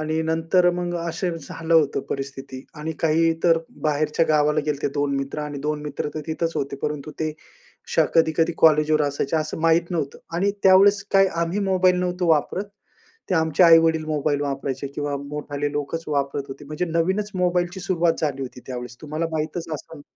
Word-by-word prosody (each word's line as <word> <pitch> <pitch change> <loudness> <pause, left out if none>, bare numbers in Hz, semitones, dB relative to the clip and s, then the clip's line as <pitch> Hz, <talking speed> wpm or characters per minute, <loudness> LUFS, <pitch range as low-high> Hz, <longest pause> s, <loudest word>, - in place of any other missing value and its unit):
आणि 155 +1 -1
नंतर 165 +3 +2
मग 175 0 -3
असं 170 +1 -2
झालं 165 +3 -3
होतं 150 -4 +3
परिस्थिती. 135 -1 -6
आणि 155 +2 -4
काही 165 +1 +3
तर 165 -2 +5 0.2
बाहेरच्या 155 +2 +1
गावाला 150 -1 +3
गेले 150 -1 0
होते, - - +1
2 145 -1 0
मित्र 135 +2 -4
आणि 150 -1 -5
2 150 +1 -2
मित्र 150 0 -4
तर 155 - -3
तिथंच 165 +1 -2
होते, 140 0 -2
परंतु 150 0 -3
ते 155 -1 -1 0.6
श - - +2
कधी-कधी 165 0 +3
कॉलेजवर 155 -1 +4
असायचे 145 +1 -1
असं 155 0 -2
माहीत 165 +1 +2
नव्हतं. 155 -6 -3 0.2
आणि 195 +3 +2
त्यावेळेस 195 +1 +6
काय 195 0 +6 0.2
आम्ही 170 +4 -1
मोबाईल 185 -1 +4
नव्हतो 180 0 -1
वापरत. 160 +5 +1 0.7
ते - - +3
आमचे 160 0 +2
आई-वडील 165 -1 +5
मोबाईल 150 -1 0
वापरायचे 140 -1 -3
किंवा 145 -1 -2
मोठाले 145 0 -3
लोकचं 150 +2 -4
वापरत 140 0 -1
होते 135 +2 -9
म्हणजे 150 +4 -3
नवीनचं 190 +5 -1
मोबाईलची 180 +1 0
सुरुवात 175 -3 +1
झाली 140 -3 -1
होती 125 -1 -8
त्यावेळेस. 125 -1 -6
तुम्हाला 155 +2 -2
माहीतचं 160 +1 -3
असेल. 150 0 -10
155 Hz, 175 wpm, -23 LUFS, 145-170 Hz, 0.7 s, त्यावेळेस